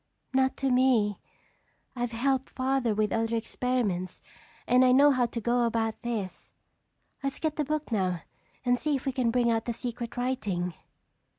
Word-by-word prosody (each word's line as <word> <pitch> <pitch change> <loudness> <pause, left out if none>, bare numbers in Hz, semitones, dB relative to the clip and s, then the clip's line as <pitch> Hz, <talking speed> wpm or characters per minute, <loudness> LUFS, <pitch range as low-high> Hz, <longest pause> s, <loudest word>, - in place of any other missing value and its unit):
"Not 265 0 +2
to 270 -1 0
me. 250 -5 +3 0.8
I've 245 -1 -2
helped 265 +3 0
Father 260 -4 0
with 210 0 +1
other 225 0 0
experiments 225 -6 -2 0.4
and 250 +1 +5
I 255 - +5
know 285 +3 +7
how 250 -3 +2
to 235 - -4
go 240 +2 +1
about 230 -1 0
this. 225 -6 -4 0.7
Let's 275 -1 -2
get 315 -2 -1
the 300 - 0
book 305 -1 -3
now 185 -5 0 0.4
and 245 0 +3
see 300 -2 0
if 270 - -4
we 270 - +1
can 255 -3 +1
bring 240 0 +2
out 225 -1 0
the 235 - -1
secret 240 0 -5
writing." 205 -9 -1
245 Hz, 170 wpm, -28 LUFS, 225-260 Hz, 0.8 s, know